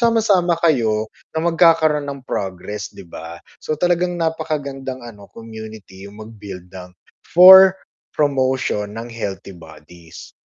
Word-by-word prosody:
sama-sama 210 -7 +2
kayo 110 -9 +1 0.3
na 160 - -1
magkakaroon 160 -3 +3
ng 140 -2 -7
progress, 100 0 -5
'di 100 - -14
ba? 85 0 -10 0.2
So, 155 - -4
talagang 175 +2 0
napakagandang 145 -6 -4
ano 105 -4 -13
community, 110 -4 -11
yung 100 - -15
mag-build 100 -5 -11
ng 90 -1 -12 0.3
for 190 +2 +8 0.4
promotion 130 -7 0
ng 115 +1 -8
healthy 100 -4 -6
bodies. 80 0 -14
120 Hz, 120 wpm, -19 LUFS, 100-160 Hz, 0.4 s, for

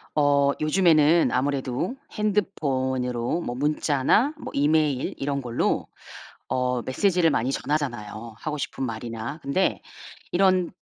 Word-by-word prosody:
어 140 -1 +4
요즘에는 160 -1 +4
아무래도 135 - -1 0.2
핸드폰으로 130 - -1
뭐 120 -7 -4
문자나 150 - +2
뭐 - - -7
이메일 145 -2 +1
이런 140 0 -2
걸로 120 -2 -1 0.6
어 125 -1 0
메시지를 170 - +2
많이 130 -2 0
전하잖아요, 120 -7 -3
하고 150 +2 -4
싶은 135 -1 -3
말이나. 115 +4 -5
근데 140 +8 0 0.5
이런 185 -1 +3
140 Hz, 270 characters per minute, -25 LUFS, 125-165 Hz, 0.6 s, 어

